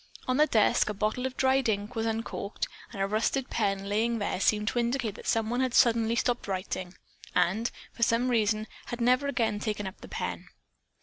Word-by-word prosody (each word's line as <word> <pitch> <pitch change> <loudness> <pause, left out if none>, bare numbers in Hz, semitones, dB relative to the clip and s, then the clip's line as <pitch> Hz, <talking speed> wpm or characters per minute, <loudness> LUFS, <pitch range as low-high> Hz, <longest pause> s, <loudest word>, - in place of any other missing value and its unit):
On 255 0 +1
the 305 +1 +5
desk 215 -3 +3
a 210 - -3
bottle 215 +5 0
of 260 - -9
dried 265 -2 +3
ink 205 +2 -1
was 225 0 0
uncorked 225 -2 -3 0.2
and 205 - -8
a 195 - +2
rusted 220 +6 0
pen 200 -3 0
lying 225 +3 +1
there 205 -3 -2
seemed 210 +1 +2
to 240 - -1
indicate 235 -2 0
that - - -10
someone 225 +2 +1
had 260 -2 0
suddenly 230 -1 +4
stopped 240 0 0
writing, 185 -1 -3 0.4
and, 220 +7 +2 0.2
for - - -12
some 235 +2 +3
reason, 215 -2 +2 0.2
had 240 - -5
never 250 +4 +3
again 225 -6 0
taken 210 -1 -2
up 190 +1 -7
the - - -9
pen. - - -4
225 Hz, 195 wpm, -29 LUFS, 210-245 Hz, 0.4 s, the